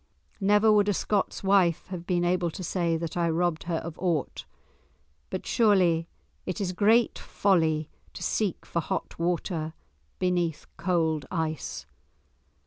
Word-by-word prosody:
Never 210 +2 +4
would 210 -1 +4
a 205 - +1
Scot's 200 +1 -1
wife 190 -4 +3
have 175 -2 -6
been 175 -1 +1
able 175 -1 +1
to 185 - -7
say 170 -1 0
that 165 -1 -5
I 170 -1 +1
robbed 170 0 0
her 170 -1 -1
of 160 0 -5
aught. 170 -6 -1 0.8
But - - -4
surely 180 -7 +3 0.4
it 185 - -4
is 190 -3 -1
great 220 +5 +3
folly 160 -6 +1 0.3
to - - -7
seek 205 -5 -1
for 170 - -2
hot 165 - -4
water 170 -2 -1 0.4
beneath 175 -4 0
cold 160 -5 0
ice. 155 - -3
175 Hz, 140 wpm, -27 LUFS, 165-190 Hz, 0.8 s, Never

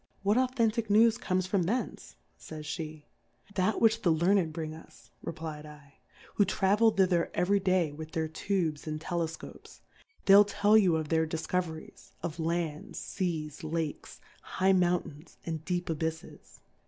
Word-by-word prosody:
What 205 +2 +3
authentick 235 -3 +1
News 225 +2 +5
comes 185 0 0
from 185 -2 0
thtncQ^ 240 +8 -3 0.2
fay 155 - -9
sjjje? 155 0 -6 0.5
That 190 +2 +1
which 225 0 +3
the 175 - +2
Learn 175 +6 +3
ed 165 -4 -2
bring 155 -1 -5
us, 160 - -15
replfal^ 150 -2 -7 0.5
who 205 - +4
travel 200 +3 +3
thither 185 -5 +2
every 200 +3 +2
Day 185 -5 +1
with 155 +2 -9
their 160 -1 -1
Tubes 160 -2 -2
and 155 0 -3
Telef 160 0 -3
copes; - - -13 0.4
they'll 200 +1 +8
tell 205 +1 +2
you 190 -6 +5
of 155 -2 -2
their 160 -1 +2
Difcove. 165 +2 -1
ries, 160 0 -12
of 170 0 -4
Lands, 165 -2 -2
Seas, 160 -6 -4
Lakes, 155 -1 -4 0.2
high 190 +1 +1
Moun 180 -1 +3
tains, 150 +3 -13
and 160 -2 -4
deep 180 -1 -2
Abyffes. 160 0 -5
170 Hz, 155 wpm, -30 LUFS, 160-195 Hz, 0.5 s, they'll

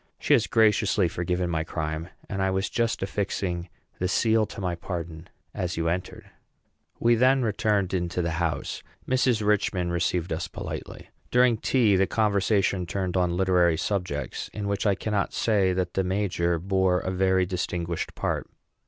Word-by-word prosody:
She - - +2
has - - +4
graciously 105 -3 +3
forgiven 90 +1 -1
my 80 -1 0
crime, 80 +1 -4 0.2
and 95 -1 -3
I 95 - +2
was 95 +1 -1
just 115 -4 0
affixing 95 -3 -2 0.3
the 90 - 0
seal 110 +2 +2
to - - -9
my 90 -3 -1
pardon 85 -1 -6 0.2
as 90 -1 -3
you 85 0 0
entered." 90 +2 -4 0.7
We 120 +1 +4
then 130 +3 +4
returned 105 -3 0
into 90 -1 -1
the 85 - -1
house. 80 -4 -2 0.3
Mrs. 125 -4 +2
Richman 95 -4 +1
received 85 0 0
us 85 +3 -3
politely. - - -7 0.2
During 125 -1 +4
tea, 110 -4 +3
the 95 0 +3
conversation 100 -3 +1
turned 95 0 -2
on 90 -1 +1
literary 90 -3 +3
subjects, 85 -9 -3
in 105 -1 -4
which 100 +1 0
I 100 - +3
cannot 105 +1 -1
say 100 -5 +2
that 90 -1 -1
the 95 - +1
major 90 -3 0
bore 95 +1 +1
a 95 - -3
very 95 0 +2
distinguished 85 -2 -3
part. - - -2
95 Hz, 160 wpm, -26 LUFS, 85-105 Hz, 0.7 s, has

